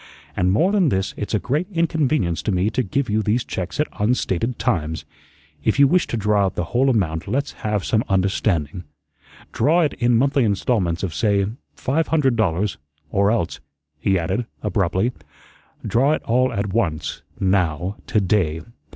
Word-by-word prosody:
And 90 0 +2
more 170 - +3
than 195 -7 +3
this, 95 -4 -1
it's 105 +1 -3
a - - +2
great 150 - -1
inconvenience 155 - +1
to - - -1
me 95 +3 +1
to 130 - 0
give 125 +5 -1
you 110 +1 +1
these 110 +3 +1
checks 90 +9 -5
at 150 - +2
unstated 115 +1 0
times. 80 -9 -1 0.6
If 110 - +1
you 140 0 +7
wish 180 +5 +2
to 120 - -2
draw 105 -1 +2
out 95 - -5
the 90 - -1
whole 130 +3 +3
amount 85 -10 0
let's 140 +3 -1
have 105 -2 -1
some 110 0 +1
understanding. 95 -4 0 0.7
Draw 165 +4 +3
it 150 -4 +1
in 120 -1 +2
monthly 140 +2 +2
installments 100 -5 0
of, 90 -5 -2
say, 100 +5 +2 0.3
five 155 +5 0
hundred 140 -6 +2
dollars, 100 -3 0 0.3
or 100 +1 +3
else," 110 -7 -1 0.4
he 95 +2 +2
added, 100 +8 -2 0.2
abruptly, 100 +2 +1 0.7
"draw 135 +6 +3
it - - -2
all 125 +2 +2
at 100 -3 -2
once, 80 -9 -1 0.2
now, 95 -1 0
to 105 - +2
day. 90 -5 +1
105 Hz, 170 wpm, -22 LUFS, 95-125 Hz, 0.7 s, you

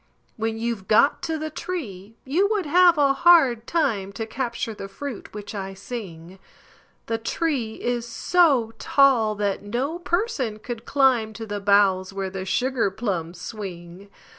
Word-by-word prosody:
When 225 0 -2
you've 225 -4 -3
got 225 +7 +4
to 320 -1 -2
the 310 0 -5
tree, 225 - -6
you 350 +10 +2
would 415 -5 0
have 350 +2 +5
a 280 -2 +4
hard 275 -8 +5
time 210 - 0
To 225 +2 -4
capture 235 -1 -3
the 195 - -7
fruit 235 +5 -7
which 210 +1 -8
I 195 -1 -5
sing; 190 -5 -8 0.7
The 225 0 -2
tree 240 -3 -2
is 240 -1 -2
so 265 -4 +2
tall 250 -6 +3
that 200 -1 -1
no 260 +11 -3
person 345 - -1
could 235 +1 -7
climb 255 -6 +2
To 225 +1 -7
the 205 -1 -4
boughs 195 -2 +3
where 195 -1 -3
the 190 0 -5
sugar 245 +2 0
plums 180 -5 -4
swing! 185 -2 -8
225 Hz, 155 wpm, -24 LUFS, 200-275 Hz, 0.7 s, have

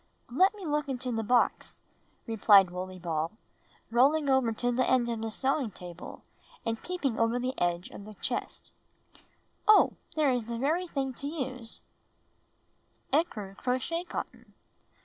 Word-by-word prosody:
"Let 375 - +4
me 400 -3 -8
look 295 -2 -1
into 255 -1 -3
the 225 -1 -1
box," 245 +3 +1 0.4
rephed 205 -4 +6
Wooley 185 +1 -5
Ball, 165 -2 -2 0.6
rolling 280 +4 +4
over 265 -3 +3
to 245 +2 -1
the 250 +1 +1
end 250 -2 +3
of 230 -2 -2
the 225 - -2
sewing 265 +2 0
table 175 -2 -10 0.4
and 225 0 -2
peeping 290 -10 -2
over 230 +1 +2
the 255 +1 -1
edge 175 0 0
of 200 - -10
the 215 0 -10
chest, - - -4 1.0
"Oh, 425 -1 +6 0.2
there 300 -3 +3
is 245 -3 -1
the 235 0 -4
very 320 +8 0
thing 270 -4 -2
to 280 - -6
use 260 -6 -5 0.6
— - - -30
ecru 215 - 0
crochet 260 - -1
cotton. - - -7
245 Hz, 150 wpm, -29 LUFS, 215-280 Hz, 1.0 s, rephed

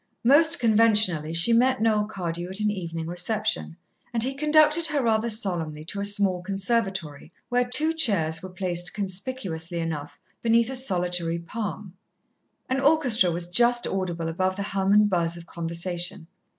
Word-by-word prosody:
Most 295 +6 +5
conventionally, 215 -8 +3
she 165 +8 +3
met 255 +3 +3
Noel 215 -2 +1
Cardew 175 -4 -5
at 190 +2 -2
an 210 0 0
evening 165 -4 -5
reception, 175 - -2 0.3
and 230 -2 +2
he 265 +2 0
conducted 305 +3 +3
her 295 -3 -1
rather 225 0 +1
solemnly 175 -9 0
to 200 - -5
a 200 - -1
small 200 -3 +2
conservatory 195 - -2 0.2
where 245 0 +2
two 310 +6 +1
chairs 195 - +1
were 185 - -8
placed, 180 -1 -2
conspicuously 190 -4 -4
enough, 160 -3 -5 0.2
beneath 230 +1 +2
a - - -3
solitary 180 -8 0
palm. 195 +1 -6 0.7
An 260 +1 -1
orchestra 270 - +3
was 170 +1 -2
just 240 +4 +3
audible 175 -4 -3
above 185 +3 -1
the 200 - -4
hum 195 0 0
and 210 0 +5
buzz 170 -3 -1
of 170 - -11
conversation. 170 +2 -4
195 Hz, 155 wpm, -25 LUFS, 170-230 Hz, 0.7 s, Most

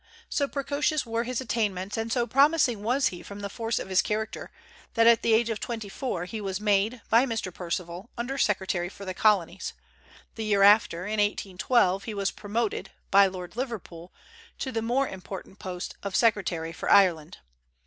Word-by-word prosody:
So 280 - 0
precocious 285 +2 -1
were 230 +1 -2
his 255 +1 -2
attainments, 210 -5 -1
and 225 0 -3
so 240 -1 +1
promising 270 -2 +3
was 250 +6 +2
he 175 -2 -9
from 200 0 -9
the 200 -1 -5
force 225 +1 -2
of - - -4
his 190 0 +4
character, 215 +1 -3 0.5
that 230 -1 +4
at 230 -1 +6
the 225 -1 +4
age 230 +1 +2
of 220 - -3
twenty 225 -4 -5
four 195 -6 -3
he 215 +3 -6
was 190 -1 -3
made, 210 +3 +1
by 235 +4 +5
Mr. 225 -6 -3
Perceval, 175 +3 -5
under 260 +4 -3
secretary 190 -4 0
for 200 +1 -10
the 185 - -3
Colonies; 190 -4 +1 0.6
the 225 - -5
year 205 -2 +3
after 200 -4 +5
(in 210 +1 -2
1812) 195 -1 +1
he 220 - -5
was 200 -1 0
promoted, 215 +1 -2 0.2
by 200 0 +7
Lord 185 0 -7
Liverpool, 205 -9 -6 0.5
to 260 - -4
the 225 - -1
more 250 +4 +1
important 190 +1 -9
post 180 -1 -5
of 200 -1 -4
secretary 190 -7 +1
for - - -4
Ireland. 175 -6 +4
210 Hz, 180 wpm, -27 LUFS, 190-235 Hz, 0.6 s, by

